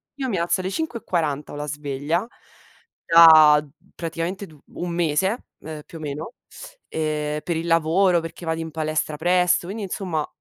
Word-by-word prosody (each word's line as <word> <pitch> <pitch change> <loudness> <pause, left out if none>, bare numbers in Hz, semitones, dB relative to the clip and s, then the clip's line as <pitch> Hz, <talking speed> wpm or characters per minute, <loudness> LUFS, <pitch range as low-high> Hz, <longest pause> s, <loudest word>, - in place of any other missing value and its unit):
io 265 -2 -3
mi 200 - -1
alzo 170 +2 0
alle 185 - -3
ore - - -5
05:40 170 - -2
ho - - -7
la 145 0 -5
sveglia, 145 +6 -2 0.8
da 155 -3 +8 0.3
praticamente 170 +4 -4
d 155 - -17 0.2
un 175 - -4
mese, 175 +6 0
ehm, 155 -1 -8
più 165 - -11
o - - -10
meno, 150 - -5 0.6
ehm, 150 -1 -2
per 170 - -2
il 165 +1 -4
lavoro, 170 +2 +3
perché 165 +2 -9
vado 160 0 -2
in 160 0 -6
palestra 155 -1 -2
presto, 180 +1 +2
quindi 210 +3 -5
insomma, 180 -5 -3
165 Hz, 165 wpm, -23 LUFS, 155-180 Hz, 0.8 s, da